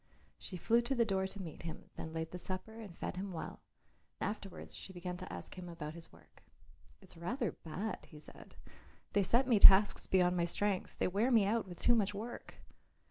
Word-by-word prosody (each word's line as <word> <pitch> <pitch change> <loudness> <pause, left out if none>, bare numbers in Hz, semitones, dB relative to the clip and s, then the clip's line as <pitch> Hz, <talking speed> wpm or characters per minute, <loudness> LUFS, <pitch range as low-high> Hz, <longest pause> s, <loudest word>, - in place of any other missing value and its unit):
She 185 - -6
flew 230 +7 +3
to 240 +3 -1
the 235 -2 +3
door 190 -2 0
to 200 - -9
meet 160 -4 -8
him, 165 -1 -8
then 160 - -6
laid 160 0 -4
the 180 - -6
supper 190 +5 -6
and 200 -6 -10
fed - - -4
him 195 +1 -4
well; 165 - -6 0.6
afterwards 200 -1 -5
she - - -9
began 180 0 -5
to 185 - -8
ask - - -7
him 175 -1 -7
about 155 -2 -6
his 170 0 -11
work. - - -21 0.6
"It's - - -15
rather 230 +6 -2
bad," 190 +7 -5
he 150 - -12
said; - - -14 0.6
"they 200 - +4
set 235 +7 +3
me 230 -5 +4
tasks 200 +1 +8
beyond 180 -1 +3
my 170 -1 +2
strength; 195 +2 -1
they - - +1
wear 205 +7 +1
me 225 -5 +5
out 220 +1 0
with 175 -2 -8
too 240 - +4
much 205 -3 +1
work." 230 +4 -7
190 Hz, 205 wpm, -35 LUFS, 175-220 Hz, 0.6 s, tasks